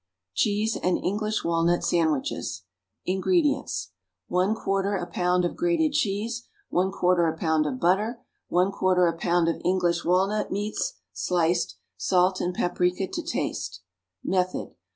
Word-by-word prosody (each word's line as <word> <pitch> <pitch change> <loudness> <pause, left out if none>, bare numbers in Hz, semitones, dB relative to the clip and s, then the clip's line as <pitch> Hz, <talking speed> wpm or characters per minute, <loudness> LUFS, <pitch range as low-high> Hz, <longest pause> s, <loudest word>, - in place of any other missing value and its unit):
=Cheese 210 - +1
and 180 - +1
English 215 +3 -1
Walnut 170 +1 +2
Sandwiches.= 160 -5 0 0.4
INGREDIENTS. 290 - +1 0.4
1/4 195 +1 +1
a 175 - -3
pound 180 0 +1
of 175 - -2
grated 335 -3 +1
cheese. 230 -3 -1 0.3
1/4 180 -2 +2
a 160 - -10
pound 160 -2 +1
of 130 -3 -3
butter. 210 +7 +1 0.3
1/4 180 -1 +3
a - - -13
pound 170 0 +2
of 165 - -1
English 175 -2 +1
walnut 195 +4 +1
meats, 210 - -2 0.2
sliced. 175 -1 0 0.2
Salt 185 0 +2
and 180 0 -1
paprica 180 +2 0
to - - -2
taste. 90 +1 -3 0.5
_Method. 185 0 0
180 Hz, 125 wpm, -26 LUFS, 175-205 Hz, 0.5 s, 1/4